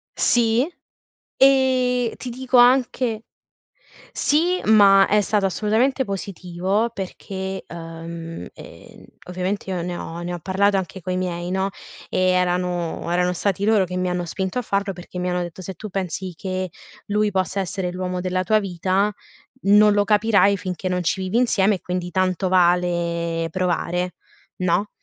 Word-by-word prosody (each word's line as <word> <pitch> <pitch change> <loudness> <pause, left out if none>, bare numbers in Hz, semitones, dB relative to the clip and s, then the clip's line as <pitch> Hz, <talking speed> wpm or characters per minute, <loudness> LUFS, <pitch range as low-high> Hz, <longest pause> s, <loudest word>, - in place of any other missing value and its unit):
Sì, 240 +3 +2 0.7
e 255 -3 +3
ti 250 - -6
dico 255 +1 0
anche 245 -2 +3 0.9
Sì, 345 +5 +1
ma 200 -2 +6
è 210 0 +3
stato 205 -1 +1
assolutamente 225 +8 +1
positivo 195 +2 -2
perché, 190 0 -5
uhm, 165 - -7
ehm, - - -14 0.2
ovviamente 185 +2 -3
io 180 -2 -2
ne 175 0 -4
ho 170 0 -6
ne 175 +1 -4
ho 175 - -5
parlato 195 +3 +1
anche 190 0 -5
coi 185 +2 -2
miei, 175 -1 -3
no, 190 +1 0 0.4
e - - -1
erano 180 -2 -1
erano 180 +1 +1
stati 200 +2 -1
loro 215 -3 +4
che 180 +1 -5
mi 185 0 0
hanno 180 0 -2
spinto 190 +6 -3
a - - -1
farlo 200 -1 -1
perché 180 0 -8
mi 180 0 -1
hanno 180 0 0
detto: 175 +1 -6
"Se 190 +1 -6
tu 215 +5 -8
pensi 185 -1 -4
che 185 0 -3 0.4
lui 210 0 +1
possa 190 +1 -1
essere 185 -1 -3
l'uomo 180 0 -3
della 185 0 -1
tua 215 +3 +3
vita, 190 +2 0 0.5
non 210 +1 +6
lo 205 - +3
capirai 205 -1 +4
finché 185 0 -4
non 180 0 0
ci 190 +3 0
vivi 190 +5 -1
insieme 210 -4 +3
e 185 - -9
quindi 180 0 -4
tanto 185 +1 0
vale 170 -2 +1
provare, 180 0 -1 0.4
no?" 185 +3 +1
190 Hz, 155 wpm, -22 LUFS, 180-210 Hz, 0.9 s, ma